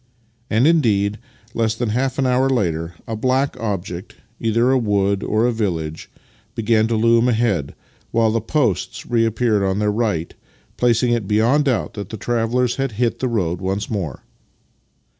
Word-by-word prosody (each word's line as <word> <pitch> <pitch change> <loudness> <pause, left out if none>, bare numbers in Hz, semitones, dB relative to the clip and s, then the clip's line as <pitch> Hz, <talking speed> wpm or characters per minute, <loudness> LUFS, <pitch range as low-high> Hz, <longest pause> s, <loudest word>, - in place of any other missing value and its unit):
" 115 +1 -40
And, 115 +4 +3
indeed, 110 -10 +2 0.3
less 110 -1 0
than 120 0 -2
half 130 +4 -1
an 135 - +1
hour 130 +1 +2
later 85 -9 -1
a 115 - -4
black 130 +5 0
object 95 -3 -4
— 115 - -39
either 115 +3 +2
a 135 - +4
wood 100 -3 +1
or 110 +2 +1
a 125 - +2
village 85 -9 -3 0.2
— - - -35
began 110 -1 +2
to 115 - 0
loom 115 +2 +3
ahead, 110 - 0 0.3
while 115 -1 +2
the 115 0 0
posts 120 - -1
reappeared 115 -2 +1
on 95 0 0
their 105 0 +1
right, 105 -7 -1 0.4
placing 120 0 +2
it 115 -4 0
beyond 115 +8 +3
doubt 130 -5 0
that 100 -2 -6
the 110 - -6
travellers 120 +2 0
had 135 -4 -2
hit 120 +2 0
the 130 - 0
road 90 -6 -1
once 95 +3 -2
more. 90 - -4
115 Hz, 175 wpm, -20 LUFS, 100-120 Hz, 0.4 s, a